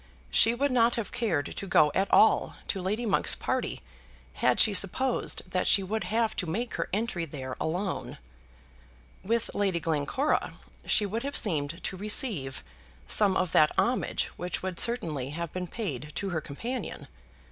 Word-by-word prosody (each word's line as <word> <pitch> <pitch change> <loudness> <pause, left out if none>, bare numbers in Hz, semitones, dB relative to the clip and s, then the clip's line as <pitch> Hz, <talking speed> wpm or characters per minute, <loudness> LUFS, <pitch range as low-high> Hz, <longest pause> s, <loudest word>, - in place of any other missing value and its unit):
She 230 - +5
would 280 +3 0
not 235 -1 +3
have 225 -5 -4
cared 205 - -1
to 200 - -5
go 150 -5 +4
at 195 +1 +1
all 220 - +4
to 195 - -1
Lady 210 +6 -2
Monk's 215 - +2
party - - -2 0.5
had - - +1
she 215 - +5
supposed 235 +7 +1
that 185 -1 0
she 195 - +4
would 205 +1 -3
have 225 +2 0
to 180 - -2
make 230 +9 -3
her - - -3
entry 205 -3 -1
there 135 -5 -6
alone. 180 +5 -3 1.1
With 230 +4 -1
Lady 195 -4 0
Glencora 165 - 0 0.3
she 210 - +2
would 220 +4 -3
have 280 +2 +1
seemed 165 -4 0
to 190 - -4
receive 200 - 0 0.4
some 190 - +3
of 185 -3 0
that 150 - +5
homage 250 +2 0
which 180 +1 -4
would 185 -2 -3
certainly 160 - +2
have 165 +2 -5
been 185 0 -4
paid 150 - -5
to 200 - -2
her 160 -3 -2
companion. 230 - -6
190 Hz, 165 wpm, -28 LUFS, 165-230 Hz, 1.1 s, She